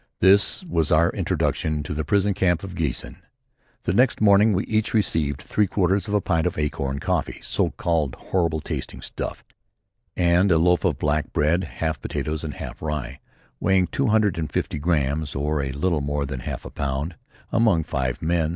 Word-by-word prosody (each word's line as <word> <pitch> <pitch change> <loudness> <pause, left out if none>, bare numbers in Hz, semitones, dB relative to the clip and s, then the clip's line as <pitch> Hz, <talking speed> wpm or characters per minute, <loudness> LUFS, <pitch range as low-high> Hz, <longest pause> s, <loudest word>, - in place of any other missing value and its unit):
This 100 - +4
was 80 - 0
our 85 +2 +4
introduction 75 -1 -1
to 75 - -4
the 75 +1 -2
prison 100 +6 +2
camp 90 -2 +1
of 95 -2 -7
Giessen. 75 -8 -3 0.7
The 85 - 0
next 125 +6 +3
morning 105 +1 +5
we 95 -1 +1
each 110 +1 0
received 75 -9 +1
three 105 -1 +1
quarters 95 0 +1
of 105 - -1
a 105 - +3
pint 80 -3 +1
of - - -3
acorn 70 -2 -2
coffee, - - -2
so - - 0
called, 80 -6 -1
horrible 85 -4 -1
tasting - - -5
stuff; - - -5 0.7
and 90 +2 +3
a 85 - +5
loaf 90 +1 +3
of - - +1
black 75 +1 0
bread 85 +5 +2
half 80 -3 -3
potatoes 75 +4 -3
and 75 -2 -5
half - - -8
rye 75 -5 -4 0.4
weighing 95 0 +3
two 135 +8 -1
hundred 105 -5 +2
and 80 - -3
fifty - - -2
grams, 75 -2 0
or 75 +1 0
a 70 -1 -3
little 75 +3 0
more 70 0 -1
than 65 -2 -5
half 60 - -6
a - - -7
pound, 70 +4 -3 0.4
among 110 -8 +3
five 65 -5 -2
men. 80 -1 +1
80 Hz, 185 wpm, -24 LUFS, 75-95 Hz, 0.7 s, morning